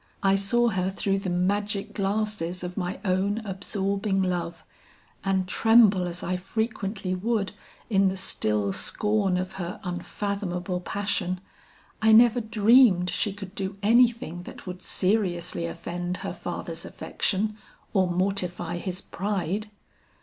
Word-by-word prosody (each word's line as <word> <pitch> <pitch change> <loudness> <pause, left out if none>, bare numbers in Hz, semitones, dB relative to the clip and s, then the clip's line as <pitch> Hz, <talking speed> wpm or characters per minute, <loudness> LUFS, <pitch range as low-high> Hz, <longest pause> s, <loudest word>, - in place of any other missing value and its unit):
I 195 0 +5
saw 235 +5 +3
her 185 -3 0
through 195 0 0
the 195 -1 -3
magic 200 +3 0
glasses 200 -3 -1
of 180 0 -5
my 180 -1 -3
own 195 +2 +1
absorbing 195 0 -1
love, 175 -2 -2 0.6
and 190 -1 +1
tremble 210 -3 +5
as 175 0 -5
I 185 +1 -1
frequently 200 -1 -2
would 205 +2 0 0.4
in 195 -3 +3
the 190 - -4
still 105 - 0
scorn 210 - +1
of 185 +1 -2
her 175 +1 -5
unfathomable 180 0 -3
passion, 185 -1 -2 0.6
I 220 0 +6
never 240 +2 +6
dreamed 220 -4 +5
she 210 - 0
could 195 -1 -9
do 195 -1 -4
anything 230 -5 +3
that - - -11
would 180 -1 -7
seriously 180 -4 0
offend 175 +1 -4
her - - -3
father's - - -5
affection 210 +2 -2 0.4
or 190 -3 +3
mortify 180 -2 -1
his 185 +1 -4
pride. 200 +1 -2
195 Hz, 130 wpm, -26 LUFS, 180-210 Hz, 0.6 s, I